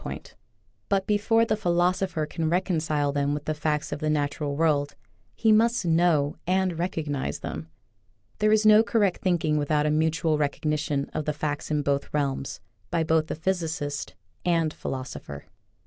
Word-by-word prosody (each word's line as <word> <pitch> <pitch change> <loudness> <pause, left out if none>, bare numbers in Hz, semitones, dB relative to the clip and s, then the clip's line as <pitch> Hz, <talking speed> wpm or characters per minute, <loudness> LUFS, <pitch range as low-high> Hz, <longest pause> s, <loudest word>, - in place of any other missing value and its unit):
55 - - -5
point, - - -14 0.5
but 195 -1 +1
before 220 +2 +3
the 220 - +1
philosopher 180 -3 +1
can 160 +1 -2
recon 180 0 +1
cile 150 -3 0
them 145 0 0
with 150 - -6
the 155 - 0
facts 150 0 -2
of 145 - -3
the 155 - -1
natural 145 -1 -1
world 145 -2 +1 0.4
he 225 -1 +3
must 225 -1 +3
know 160 -3 +2
and 185 -2 +1
recognize 155 -6 -2
them. 80 +1 -5 0.7
There 215 0 +3
is 215 0 +3
no 215 0 +8
correct 210 -5 +1
thinking 165 -4 +1
without 150 0 +1
a 150 - +2
mutual 155 0 +1
recog 145 -1 -1
nition 150 -2 -1
of 155 - -2
the 150 - 0
facts 150 0 -3
in 150 -1 0
both 140 0 -1
realms, 140 -2 -2 0.3
by 170 -2 +1
both 160 -1 +2
the - - -3
physicist 160 -4 -2 0.3
and 165 -3 +1
philosopher. 125 - -6
155 Hz, 170 wpm, -26 LUFS, 145-180 Hz, 0.7 s, no